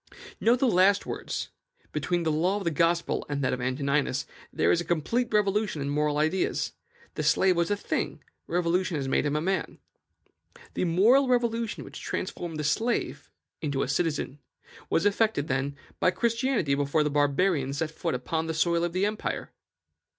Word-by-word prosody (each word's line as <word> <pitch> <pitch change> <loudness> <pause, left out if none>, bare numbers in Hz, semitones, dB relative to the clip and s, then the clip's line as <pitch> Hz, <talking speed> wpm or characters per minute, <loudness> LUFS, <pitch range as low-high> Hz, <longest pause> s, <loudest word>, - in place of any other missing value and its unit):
Note 235 +2 +4
the 265 - +2
last 195 -1 +4
words: - - -4 0.4
"Between 170 +3 -1
the 160 - +1
law 175 +6 +1
of 205 - -4
the 170 - 0
Gospel 170 +3 +1
and 140 -1 -2
that 130 - +1
of 125 - -3
Antoninus 140 +1 0 0.3
there - - +2
is 175 - +2
a - - -3
complete 175 +9 0
revolution 210 -4 +1
in 140 0 -2
moral 150 0 +1
ideas: 160 +5 0 0.4
the - - -3
slave 170 +5 +3
was 170 0 +1
a 205 - +2
thing; - - -3 0.2
religion 175 0 0
has 135 -2 -3
made 135 - +1
him 145 - -1
a 150 - +1
man." 190 +3 -1 1.0
The - - 0
moral 220 +11 +4
revolution 235 -3 0
which - - -10
transformed 170 -3 -4
the 150 - -2
slave 230 +10 -1 0.3
into 140 -3 -1
a - - -2
citizen 145 -1 -1 0.5
was 165 - +1
effected, 205 -7 +2
then, 135 +2 -1 0.2
by - - +4
Christianity 230 - 0
before 145 +2 +1
the 150 - -1
Barbarians 145 -1 +1
set 160 0 -1
foot 165 -2 -2
upon 160 +6 -2
the 160 - -2
soil 170 +1 +2
of 175 -1 -1
the 185 +2 +1
empire. 210 +1 -3
170 Hz, 175 wpm, -27 LUFS, 145-195 Hz, 1.0 s, Note